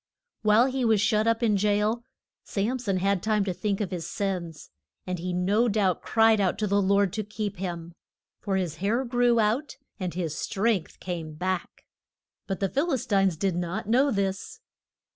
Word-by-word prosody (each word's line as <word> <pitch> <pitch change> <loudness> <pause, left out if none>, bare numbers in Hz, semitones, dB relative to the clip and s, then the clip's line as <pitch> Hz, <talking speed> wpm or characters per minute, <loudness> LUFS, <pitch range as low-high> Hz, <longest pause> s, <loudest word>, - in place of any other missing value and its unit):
While 215 +2 +5
he 265 -1 -1
was 225 -3 +3
shut 215 +1 +2
up 230 +1 +1
in 210 -3 +3
jail 210 +3 +1 0.4
Sam 225 +6 -1
son 200 -6 -1
had 195 0 +1
time 215 -2 +1
to 185 - -1
think 200 +1 -2
of 200 - -2
his 170 -3 -4
sins, 180 -6 -4 0.3
and 180 -1 -3
he 180 +2 -3
no 195 +7 +2
doubt 200 -5 +1
cried 225 -2 +4
out 185 -2 +1
to 215 - 0
the 200 0 +2
Lord 200 -1 +2
to 215 - -2
keep 210 -1 -4
him. 170 -2 -5 0.5
For 195 -2 -2
his 175 -5 -2
hair 220 +8 0
grew 245 -1 +2
out 240 +7 0 0.2
and 180 -3 -3
his 165 -4 -2
strength 205 -3 -1
came 165 -4 -5
back. 185 +2 -3 0.6
But 195 0 -3
the 195 - +1
Phil 300 - 0
is 260 - -1
tines 195 -5 +2
did 190 +1 0
not 180 +4 -3
know 260 +6 +3
this. 200 - -2
200 Hz, 185 wpm, -26 LUFS, 185-225 Hz, 0.6 s, While